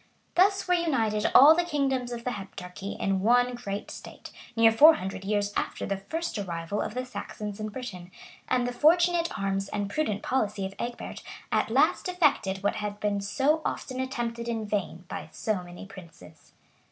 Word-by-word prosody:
Thus 390 +2 +3
were 360 - +3
united 230 -11 +1
all 290 +4 +10
the 350 - +2
kingdoms 270 -6 -1
of 235 -1 -5
the 250 - -1
Heptarchy 195 -1 -7
in 195 -1 +1
one 245 +4 +3
great 205 -5 -5
state, - - -10 0.2
near 225 -1 +6
four 305 +8 +8
hundred 190 +1 -5
years 205 0 0
after - - -2
the 195 - -2
first 315 - -4
arrival 175 +1 -3
of 215 - -4
the 255 0 -2
Saxons 210 -4 -6
in 215 0 -3
Britain; 205 -7 -7 0.4
and 250 -1 +1
the 245 - -2
fortunate 340 +4 +4
arms 195 0 -1
and 200 -1 -3
prudent 215 -9 -1
policy 210 -6 -1
of 190 - -5
Egbert 240 0 -5 0.3
at - - +1
last - - +2
effected 245 - +1
what 205 - +1
had 210 -1 -4
been 205 -1 0
so 280 +10 +1
often 255 -1 -4
attempted 240 -3 -3
in 225 -2 -2
vain 195 -4 -3
by 155 - -6
so 210 0 -2
many 175 +2 -10
princes. 170 -5 -14
215 Hz, 175 wpm, -27 LUFS, 195-260 Hz, 0.4 s, all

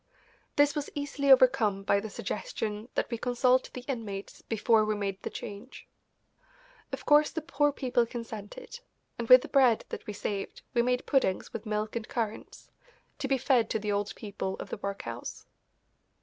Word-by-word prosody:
This 290 0 +4
was 295 -1 -2
easily 285 -1 0
overcome 250 -7 +5
by 200 - +3
the 215 +2 -6
suggestion 215 - -4
that - - -1
we 235 - -2
consult 250 +1 +2
the 250 - -6
inmates 215 -7 -5
before 225 0 +2
we 215 0 0
made 195 -1 -3
the - - -4
change. 205 +6 -9 1.0
Of - - -5
course 295 0 +6
the 325 - -3
poor 290 -2 +1
people 245 -4 +1
consented, 230 - -7 0.4
and 235 - -4
with 255 0 +10
the - - -6
bread 255 -5 +4
that - - -7
we 210 - -4
saved 200 -1 -4
we 240 - +4
made 250 +1 0
puddings 260 -10 +1
with 225 0 -6
milk 215 +1 -2
and 230 -2 -3
currants, 225 -3 -4 0.5
to 280 - -2
be 270 0 +2
fed 250 -3 +2
to - - +1
the 210 -1 -2
old 205 0 -1
people 200 -3 -4
of - - -8
the - - -3
workhouse. 200 0 -6
235 Hz, 175 wpm, -29 LUFS, 210-265 Hz, 1.0 s, with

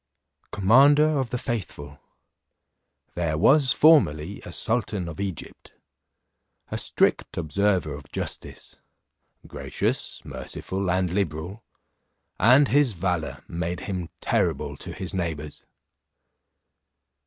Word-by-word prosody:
Commander 135 +9 +5
of 130 -3 -2
the 125 - -2
faithful, 75 - -5 1.1
there 80 -3 -1
was 135 - +4
formerly 100 - +4
a - - -9
sultan 105 -2 -1
of 85 0 -8
Egypt, 95 -5 -6 1.0
a - - -2
strict - - 0
observer 90 -1 0
of 70 -1 -11
justice, - - -6 0.7
gracious, - - -3
merciful, 95 0 -5
and 90 -1 +1
liberal, 90 +2 -3 0.8
and 130 +5 +6
his 140 -3 +4
valour 90 -3 -2
made 85 +1 -3
him 90 -4 -4
terrible - - 0
to - - -8
his 95 +1 -6
neighbours. 80 -5 -4
95 Hz, 100 wpm, -25 LUFS, 85-115 Hz, 1.1 s, and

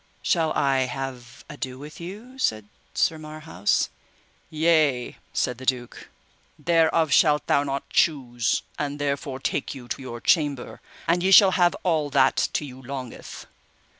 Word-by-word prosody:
Shall 165 -3 +2
I 135 -2 +2
have 130 -2 -7
ado 130 -1 -6
with 150 +3 -10
you? 215 +9 -9
said 110 - 0 0.3
Sir 160 -1 +1
Marhaus. 155 - -1 0.6
Yea, 155 -5 +2
said 125 -1 -1
the 130 - -9
duke, 125 -3 -2 0.5
thereof 165 -2 +2
shalt 150 +1 +4
thou 140 - +3
not 140 -1 -3
choose, 120 -7 +1 0.2
and 145 -1 -2
therefore 140 -1 -2
take 135 - -2
you 125 -3 -10
to - - -4
your 120 -2 -7
chamber, 145 -3 0 0.3
and 175 +1 +2
ye 190 - +2
shall 195 0 +8
have 175 -1 +3
all 160 -5 +1
that 135 -1 +3
to 150 - -1
you 130 -1 -11
longeth. 130 -2 -8
140 Hz, 145 wpm, -25 LUFS, 130-160 Hz, 0.6 s, shall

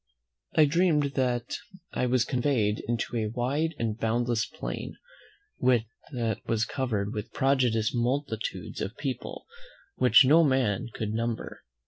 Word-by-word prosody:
I 155 - +7
dreamed 150 -2 +2
that 125 -3 -1 0.4
I 125 - 0
was 125 -1 +2
conveyed 120 -5 +1
into 120 +1 -2
a 110 -1 0
wide 140 +8 -1
and 115 -1 -2
boundless 115 0 0
plain, - - -6 0.6
that 120 -1 0
was 110 -1 +1
covered 110 -6 -2
with 105 -2 -5
prodigious 125 -5 +2
multitudes 120 -1 -2
of 100 - -4
people, 135 -4 -5 0.5
which 130 +2 +7
no 160 +5 +6
man 130 -9 +1
could 110 0 -3
number. 115 0 -3
120 Hz, 125 wpm, -28 LUFS, 110-135 Hz, 0.6 s, I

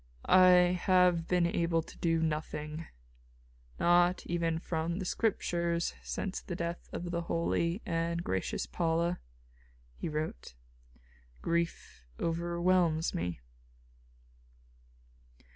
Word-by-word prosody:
"I 180 -1 +6
have 180 -3 +4
been 180 -1 +2
able 170 -1 +1
to - - -14
do 165 -1 +1
nothing, 155 0 -3 0.9
not 175 +1 +3
even 170 -1 0
from 165 0 -2
the 190 - -3
Scriptures, 170 -5 0
since 195 -2 -4
the 175 - -5
death 170 0 -4
of 175 0 -4
the 170 -1 -1
holy 170 +2 -1
and 170 -2 -1
gracious 95 - -2
Paula," 165 - 0 0.8
he - - -4
wrote. 150 - -4 0.9
"Grief 170 - -2 0.2
overwhelms 170 0 +1
me." 85 -6 -3
170 Hz, 100 wpm, -31 LUFS, 165-175 Hz, 0.9 s, I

